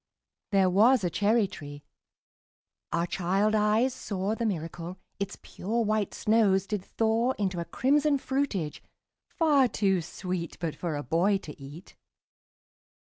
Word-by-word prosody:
There 195 -2 +4
was 220 +4 +5
a 175 - 0
cherry 210 +4 +3
tree 145 -4 -10 1.1
our 170 0 +1
child 195 +4 0
eyes 215 +4 +3
saw 200 -2 -3
The 230 0 -1
miracle: 170 -1 -4 0.2
Its 200 -1 -4
pure 225 +5 -2
white 215 -1 0
snows 210 -3 +3
did 200 -1 -3
thaw 230 +5 +1
Into 190 -5 -2
a 170 - -3
crimson 285 - +2
fruitage, 265 - -2 0.5
far 295 -6 +3
too 195 -4 +1
sweet 175 0 -5
But 165 -3 -3
for 170 -4 -3
a 145 - -3
boy 185 +7 +2
to 150 -6 -10
eat. 145 +7 -11
200 Hz, 135 wpm, -28 LUFS, 175-225 Hz, 1.1 s, was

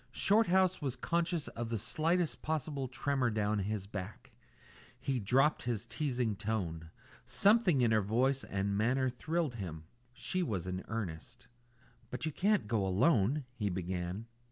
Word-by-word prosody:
Shorthouse 190 -4 +3
was 135 -4 -2
conscious 170 0 -1
of 120 0 -5
the 115 - -1
slightest 165 - 0
possible 145 -3 -2
tremor 135 0 0
down 105 -1 0
his 100 0 -2
back. 100 0 -7 0.7
He 130 0 -1
dropped 135 +8 +3
his 120 -2 -2
teasing 125 -4 -1
tone. 95 -7 -3 0.3
Something 200 - +4
in 115 - +3
her 110 -1 +4
voice 130 +7 +1
and 100 +1 -1
manner 130 +5 +2
thrilled 160 +2 -1
him. 85 -8 -6 0.3
She 185 +8 -2
was 100 - -2
in 90 0 -3
earnest. 110 +1 -5 0.6
"But 125 - -4
you 155 - -1
can't 200 - +1
go 105 -2 +1
alone 115 - +2
" - - -38
he 105 -2 +1
began. 90 +2 -3
120 Hz, 150 wpm, -33 LUFS, 100-150 Hz, 0.7 s, Something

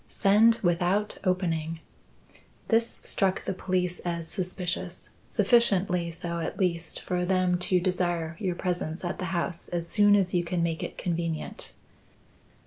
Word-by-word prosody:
Send 215 +4 +4
without 180 +4 +1
opening. 165 -4 -1 0.9
This 230 0 +1
struck 190 -2 +1
the - - -1
police 180 -1 -1
as 170 -2 -3
suspicious; 185 -1 -3 0.2
sufficiently 190 -7 +2
so, 170 +1 -3
at 165 - -4
least, 170 -3 0
for 180 -1 -2
them 180 -1 +2
to 185 - +4
desire 175 -3 -1
your 185 -3 -1
presence 175 -2 -2
at 175 - -3
the 185 - -2
house 175 -2 -1
as 170 -1 -2
soon 205 +2 +5
as 190 -3 +1
you 175 -1 +2
can 170 0 -1
make 165 -1 -1
it - - -5
convenient." 165 -2 -3
180 Hz, 140 wpm, -27 LUFS, 170-190 Hz, 0.9 s, soon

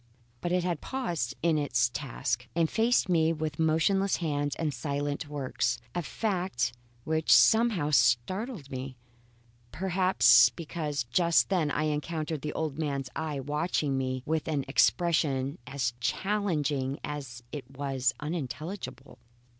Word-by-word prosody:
But 175 - -2
it 180 0 +2
had 175 -3 -2
paused 170 - -3
in 165 -2 +3
its 125 -5 +2
task, 120 -2 -3
and 165 -1 +3
faced 230 +1 +3
me 165 -3 +3
with 155 -2 -3
motionless 165 +5 +2
hands 145 -3 -1
and 155 -3 -2
silent 145 +3 -3
works 130 -4 -1 0.2
a 175 - -1
fact 175 - -1 0.3
which 160 +2 0
somehow 220 -10 +5
startled 150 - +1
me; 130 0 -6 0.7
perhaps, 165 -11 +5
because 150 0 -4
just 170 +8 +2
then 175 -6 +1
I 155 - 0
encountered 155 0 -2
the 150 - -4
old 155 -2 -3
man's 140 -4 -2
eye 155 -3 -3
watching 150 0 -1
me 130 -1 -2
with 160 0 -1
an 145 -4 -1
expression 140 -3 +2
as 130 -4 -1
challenging 150 -6 -1
as 135 -5 -6
it 140 -4 -7
was 135 -3 0
unintelligible. 150 -2 -6
150 Hz, 130 wpm, -29 LUFS, 135-170 Hz, 0.7 s, somehow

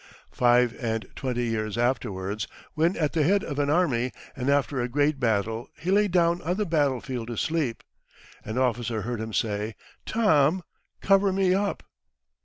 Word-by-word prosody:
Five 120 -1 +3
and 110 -1 -1
twenty 125 -2 -2
years 110 -2 -2
afterwards, 105 -5 -1 0.3
when 165 +4 +2
at 150 -3 0
the 165 - +2
head 195 +7 +3
of 145 -6 -4
an 145 0 +1
army, 135 -7 +2 0.2
and 130 0 -2
after 140 -2 +1
a 120 - -2
great 145 +2 +1
battle, 110 -1 0
he 180 - -2
lay 205 +1 +4
down 175 -2 +2
on 175 +2 -1
the 210 - 0
battlefield 135 - -1
to 120 -2 -5
sleep. 155 -8 -1 0.6
An 110 +3 -5
officer 120 -4 0
heard 120 0 -3
him 110 0 -5
say, 105 0 -1 0.3
"Tom, 175 -6 +3 0.4
cover 195 0 +4
me 190 -1 +2
up." 200 +1 -1
130 Hz, 165 wpm, -26 LUFS, 115-170 Hz, 0.6 s, lay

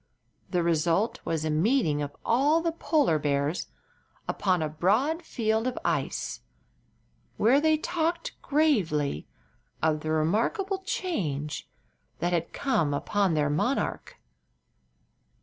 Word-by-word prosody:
The 180 -3 +1
result 170 +6 +1
was 160 -1 -1
a 155 - 0
meeting 160 - +2
of 145 0 -5
all 285 +7 +3
the 335 0 0
polar 295 - +1
bears 145 +3 -1 0.6
upon 185 -5 +1
a - - 0
broad 215 - +1
field 225 -6 -1
of 255 - -3
ice, - - -1 1.0
where 255 +7 +4
they 315 0 +4
talked 340 +9 -1
gravely 185 - +1 0.5
of 155 -1 +1
the 155 - -5
remarkable 220 - 0
change 155 - -3 0.5
that 175 +1 -1
had 170 -1 -1
come 165 - 0
upon 195 +3 +1
their 145 -1 +1
monarch. 150 - -1
185 Hz, 115 wpm, -27 LUFS, -, 1.0 s, where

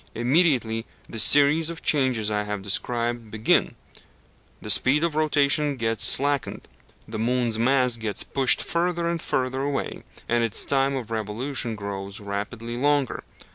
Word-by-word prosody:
Immediately 120 -3 0 0.2
the 115 - -5
series 145 - +5
of 170 -1 -8
changes 130 -7 0
I 105 0 -1
have 105 -1 -5
described 115 +3 -3
begins, 110 0 +1 0.9
the 105 - +2
speed 140 +9 +5
of 170 -2 -1
rotation 150 -1 +1
gets 115 -2 -1
slackened, 140 -2 +4 0.4
the 110 0 -6
moon's 120 -1 0
mass 125 0 +1
gets 110 -2 -4
pushed 135 -2 +2
further 170 0 -2
and 170 -1 -3
further 130 +1 -2
away, 140 0 -4 0.3
and 120 0 0
its 115 -2 +1
time 135 0 0
of 120 -4 -6
revolution 115 +3 -3
grows 100 -1 -7
rapidly 105 +3 -6
longer. 145 -1 0
125 Hz, 140 wpm, -23 LUFS, 110-140 Hz, 0.9 s, series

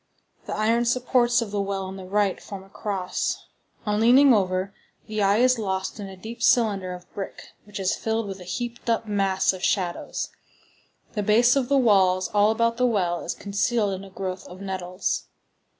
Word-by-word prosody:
The - - -3
iron 230 +3 +2
supports 245 -1 +2
of 210 - -8
the 205 -1 0
well 195 -1 -2
on 190 0 -6
the 190 -1 -8
right 200 0 +1
form 195 -2 -8
a 195 - -18
cross. 195 -2 -3 0.4
On 210 0 0
leaning 255 +4 +7
over, 190 -1 0 0.3
the 215 -1 -3
eye 200 +1 +4
is 255 0 +4
lost 190 -1 -2
in 200 -1 -6
a 190 - -10
deep 230 +5 -9
cylinder 205 -7 +3
of 180 0 -12
brick 195 - -7
which 205 -1 -8
is 190 -1 +1
filled 225 -1 -2
with 195 -1 -6
a - - -9
heaped 240 +6 -5
up 230 0 +1
mass 195 -2 +1
of 185 -1 -8
shadows. 180 -4 -1 0.8
The 210 - -1
base 235 +5 +4
of 265 -3 0
the 280 - +4
walls 190 -6 +4
all 205 0 +4
about 230 +1 +1
the 250 0 +3
well 180 -7 0
is - - -3
concealed 205 +1 0
in 190 +1 -6
a 195 - -11
growth 185 -1 -5
of 180 +1 -11
nettles. 185 -1 -3
205 Hz, 195 wpm, -25 LUFS, 190-230 Hz, 0.8 s, leaning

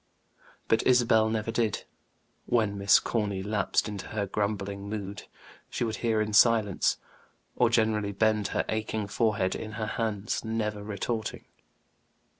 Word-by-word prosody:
But 110 - +3
Isabel 120 -3 +4
never 110 0 -1
did; 115 -3 0 0.6
when 110 -4 +1
Miss 100 -1 +5
Corny 100 -4 -2
lapsed 105 0 0
into 105 -2 -6
her 105 -2 -2
grumbling 100 0 -3
mood, 100 -2 -6 0.4
she - - -2
would 110 -2 -2
hear 115 -2 +1
in 110 0 -2
silence, 105 -2 +4 0.6
or 120 - +3
gently 110 -3 +1
bend 105 0 +1
her - - -1
aching 110 -1 -2
forehead 105 -2 0
in 110 0 -6
her 110 0 -3
hands, 110 -1 -2
never 105 -2 -2
retorting. 110 +2 -4
110 Hz, 135 wpm, -28 LUFS, 100-110 Hz, 0.6 s, Miss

